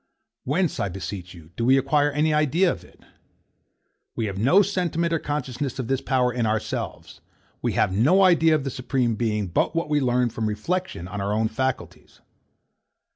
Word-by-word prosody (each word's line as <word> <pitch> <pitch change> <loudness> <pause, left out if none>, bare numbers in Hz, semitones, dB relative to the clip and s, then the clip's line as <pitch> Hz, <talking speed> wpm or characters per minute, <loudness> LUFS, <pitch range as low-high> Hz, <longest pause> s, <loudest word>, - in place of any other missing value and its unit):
Whence, 165 +5 0
I 100 - -1
beseech 90 0 -7
you, 80 -1 -15
do 115 - -3
we 130 +3 +5
acquire 145 +2 +2
any 150 +2 +1
idea 155 +5 +3
of - - -7
it? - - -20 1.1
We 115 - -1
have 100 -2 -4
no 170 - +5
sentiment 170 -3 -1
or 165 - +1
consciousness 140 -3 -3
of 130 -4 -4
this 135 -1 0
power 125 -2 +1
in 120 -2 0
ourselves. 110 0 -4 0.4
We - - -1
have 95 - +1
no 160 - +4
idea 165 -3 +5
of 150 - -1
the 135 - -3
Supreme 125 -2 -1
Being 105 -2 -1
but 90 - 0
what 165 -2 -1
we 150 -1 +2
learn 125 -2 +1
from 110 -1 -2
reflection 110 - -3
on 100 +2 -5
our 100 +1 -1
own 110 +1 +1
faculties. 130 +1 -4
130 Hz, 180 wpm, -24 LUFS, 110-155 Hz, 1.1 s, we